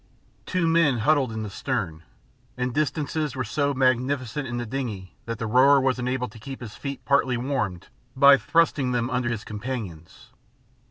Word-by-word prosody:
Two 185 -3 0
men 165 -6 +3
huddled 135 +1 +2
in 110 0 -4
the 105 - -5
stern, 95 - -3 0.6
and 125 -1 -1
distances 155 0 -1
were 130 - -1
so 140 +6 0
magnificent 130 0 0
in 120 0 -4
the 120 - -3
dingey 110 -7 -5
that 115 -1 -3
the 115 - -3
rower 130 +5 +5
was 130 -1 +1
enabled 125 0 -2
to 115 - -13
keep 135 +5 -8
his 115 -4 -8
feet 140 -1 -6
partly 135 -3 +2
warmed 110 -8 -2 0.3
by 140 +1 +8
thrusting 140 -1 +1
them 120 0 -1
under 125 -1 0
his 115 -3 -3
companions. 105 -7 -7
125 Hz, 170 wpm, -25 LUFS, 115-140 Hz, 0.6 s, by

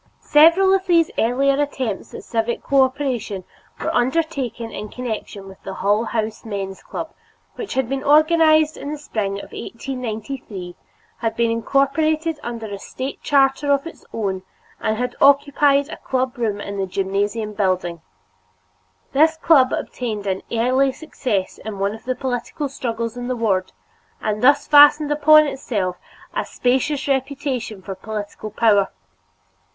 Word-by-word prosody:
Several 335 +6 +6
of 385 0 +1
these 335 -2 +4
earlier 275 +5 +2
attempts 260 -8 -3
at - - -8
civic 230 0 -2
cooperation 260 -7 0 0.4
were - - -2
undertaken 260 -3 -1
in 210 - -6
connection 220 -5 -6
with 190 -1 -13
the 195 -1 -7
Hull 205 +3 +1
House 220 -1 -3
Men's 195 -3 -5
Club, - - -6 0.4
which 415 - -6
had 265 -2 +1
been 270 +1 -3
organized 310 +1 +4
in 285 - -5
the 305 - -4
spring 215 -9 -3
of 200 - -7
1893, 230 -6 -6 0.4
had 225 -1 -1
been 235 0 +2
incorporated 300 +6 +1
under 235 -1 -5
a 200 -2 -6
State 260 +6 -6
charter 280 0 +2
of 280 +1 +2
its 330 - -10
own, 195 -4 -2 0.4
and 215 0 -1
had 250 +1 -2
occupied 280 0 +4
a 320 - -7
club 260 0 -2
room 220 -5 -1
in 200 -1 -5
the 190 - -1
gymnasium 200 +3 -1
building. 185 -4 -1 1.1
This 315 +3 +4
club 295 -5 +5
obtained 215 -5 -3
an 190 -1 -1
early 255 +4 +2
success 225 -11 -3
in 215 -2 -6
one 200 +1 0
of 220 - -11
the 255 0 -1
political 260 +3 -3
struggles 230 -2 -4
in 245 0 -4
the 255 - -1
ward 200 -6 0 0.5
and 215 0 -2
thus 285 +3 +5
fastened 295 0 +7
upon 305 +1 +6
itself 205 -10 -2 0.4
a - - 0
specious 265 +4 0
reputation 265 -6 -2
for 195 - -5
political 210 +2 -6
power. 210 -2 +3
245 Hz, 145 wpm, -21 LUFS, 210-285 Hz, 1.1 s, fastened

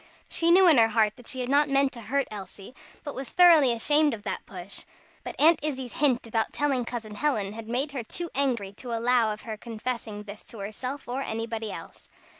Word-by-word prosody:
She 335 - 0
knew 370 +2 +7
in 310 -7 +6
her 225 - +6
heart 215 -1 +2
that 245 - -14
she 260 - -3
had 250 - -3
not 290 +1 +3
meant 275 0 +3
to 235 - -9
hurt 275 +4 -1
Elsie, 200 +2 -9 0.3
but 290 - -5
was 265 0 -6
thoroughly 330 -7 +6
ashamed 290 +4 +3
of 205 - -14
that 195 -3 -5
push; 185 +1 -8 0.4
but - - -6
Aunt 315 +2 +6
Izzie's 265 -5 -4
hint 260 -5 +1
about 225 -1 -1
telling 275 -4 0
Cousin 225 -3 -6
Helen, 210 -5 -1
had 225 0 -8
made 260 +5 -1
her 270 -3 -4
too 340 +9 -6
angry 240 -8 0
to 245 -2 -6
allow 235 -1 +2
of 210 - -6
her 220 -2 -6
confessing 225 -2 -5
this 210 0 -10
to 230 - -11
herself 250 +7 -6
or 250 +3 -3
anybody 225 -2 -4
else. - - -11
240 Hz, 215 wpm, -27 LUFS, 220-280 Hz, 0.4 s, knew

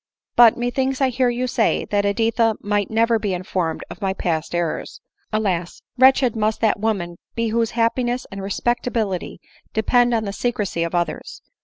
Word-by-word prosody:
"But 235 -2 +7
methinks 260 +2 -1
I 270 -2 +3
hear 250 0 +1
you 245 +1 -1
say, 235 -2 +1
that 205 -1 +2
Editha 225 +1 +2
might 205 -1 -1
never 230 +1 +2
be 205 -3 -1
informed 175 -2 -2
of - - -11
my 190 -1 0
past 165 -2 -2
errors. 170 -2 -3 0.3
Alas! 190 -6 -2
wretched 260 -2 +5
must 215 0 0
that 220 -2 +2
woman 195 -6 -2 0.2
be 230 -1 0
whose 230 0 +1
happiness 240 +2 0
and 195 0 -6
respectability 215 -1 -2 0.3
depend 240 +2 +3
on 220 - 0
the 200 -2 -4
secrecy 210 -6 -2
of 170 +1 -1
others 175 -2 -3
220 Hz, 165 wpm, -21 LUFS, 195-240 Hz, 0.3 s, But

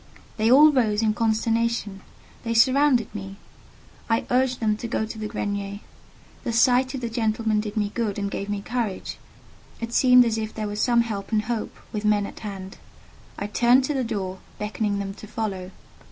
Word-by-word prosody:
They 220 +1 +2
all 300 +4 +8
rose 225 -6 +1
in 215 -1 +2
consternation; 225 -2 0 0.4
they 230 -1 -2
surrounded 260 0 +4
me. 195 -2 -7 0.7
I 225 0 +1
urged 255 0 +2
them 215 -2 +1
to 235 - -5
go 220 -1 -1
to 220 0 -8
the 215 - -3
grenier; 200 -1 -3 0.6
the - - -2
sight 250 +3 +3
of 260 - -5
the 235 - -2
gentlemen 220 -1 0
did 210 +1 -4
me 205 -1 0
good 225 -4 -2
and 200 -1 -2
gave 200 - -4
me 205 -1 -3
courage: 235 -5 -3 0.6
it 230 0 -5
seemed 250 -1 +6
as 225 -1 0
if 220 0 -5
there 215 - -3
were 205 0 -4
some 235 +2 +3
help 215 -3 -4
and 215 -1 +2
hope, 230 0 -4 0.2
with 210 -1 -3
men 210 -1 +2
at - - -9
hand. 195 -2 -7 0.6
I 200 - -3
turned 240 +5 +4
to 295 - -1
the 265 -2 0
door, 190 -5 -4 0.2
beckoning 210 -1 -2
them 195 -1 -4
to 215 - -11
follow. 200 -4 -4
220 Hz, 190 wpm, -24 LUFS, 205-235 Hz, 0.7 s, all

